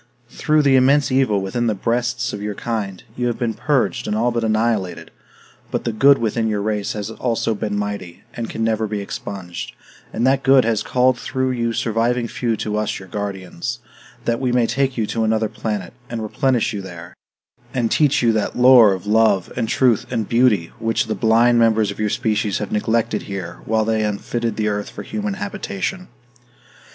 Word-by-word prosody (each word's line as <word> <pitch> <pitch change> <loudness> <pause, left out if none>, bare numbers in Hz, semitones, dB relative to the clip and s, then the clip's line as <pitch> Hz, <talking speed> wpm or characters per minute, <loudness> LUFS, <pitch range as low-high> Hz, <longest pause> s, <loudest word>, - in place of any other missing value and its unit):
Through 155 0 +2
the 140 -2 +4
immense 140 +2 +4
evil 130 -6 +2
within 120 +5 -1
the 110 - +1
breasts 120 +3 -1
of 105 - -5
your 105 0 -3
kind, 105 -5 -4
you 125 0 -1
have 120 - -2
been 115 -2 -1
purged 145 0 0
and 105 - -1
all 120 +3 +1
but 115 -1 -1
annihilated; 110 -4 -1 0.6
but - - -2
the 120 - -1
good 135 +6 +5
within 115 0 0
your 105 -2 -1
race 105 -1 -1
has 105 0 -5
also 115 -1 -1
been 105 0 -3
mighty, 100 -4 -5
and 115 -2 -5
can 110 - -3
never 110 -1 0
be 105 0 -3
expunged; 95 -2 -6 0.4
and 115 - -1
that 135 +1 +3
good 135 -2 +5
has 115 -2 +1
called 125 0 +2
through 130 -1 -1
you 115 -2 -1
surviving 115 +2 0
few 115 -1 -2
to 105 0 -2
us 105 -1 -1
your 95 -1 -11
guardians, 95 -4 -4 0.5
that 115 0 0
we 130 -2 0
may 120 -1 +3
take 135 +2 0
you 110 - +1
to 115 +2 -2
another 110 0 +1
planet, 105 -3 -4 0.2
and 115 -2 -4
replenish 120 +2 0
you 100 - -4
there, 90 -1 -10 0.6
and 120 -3 -1
teach 145 -4 +3
you 115 -1 +4
that 110 -1 -1
lore 125 -5 +7
of 95 0 -6
love 105 -3 +2
and 115 - -1
truth 125 -5 +2
and 115 -5 -2
beauty 115 -8 +2
which 115 -1 0
the 110 - -2
blind 115 +2 +4
members 110 -2 +3
of 100 - -10
your 105 -1 0
species 105 -2 0
have 105 - -4
neglected 110 +2 0
here 95 -3 -6
while 110 0 +1
they 110 0 +1
unfitted 110 +2 -2
the 105 -1 -1
earth 105 -1 -2
for - - -8
human 210 -2 -3
habitation." 195 -2 -4
110 Hz, 195 wpm, -20 LUFS, 105-120 Hz, 0.6 s, lore